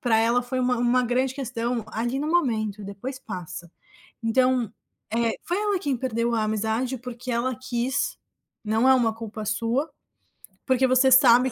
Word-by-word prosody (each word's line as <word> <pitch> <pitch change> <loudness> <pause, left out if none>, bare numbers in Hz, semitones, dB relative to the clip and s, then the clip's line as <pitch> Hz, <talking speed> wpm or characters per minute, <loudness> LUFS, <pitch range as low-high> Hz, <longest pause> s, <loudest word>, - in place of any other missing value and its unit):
Pra 235 -3 +2
ela 235 +2 +3
foi 255 +1 -3
uma 250 0 +1
uma 245 +1 +3
grande 255 +2 0
questão 240 -3 -2
ali 240 +4 -1
no 300 +2 -2
momento, 220 - 0
depois 200 +7 -6
passa. 175 -5 -7 0.5
Então, 255 0 +2 0.4
eh, 230 0 +1
foi 350 - -1
ela 410 -3 0
quem 280 -8 -1
perdeu 235 -2 -1
a 220 - +1
amizade 220 +4 -1
porque 245 +1 -7
ela 240 +2 0
quis. 260 +2 -2 0.5
Não 220 +4 +2
é - - +8
uma 235 -3 +2
culpa 220 -1 -7
sua, 230 +8 0 0.8
porque 260 0 +3
você 255 +1 +4
sabe 255 -1 +6
245 Hz, 160 wpm, -25 LUFS, 225-260 Hz, 0.8 s, é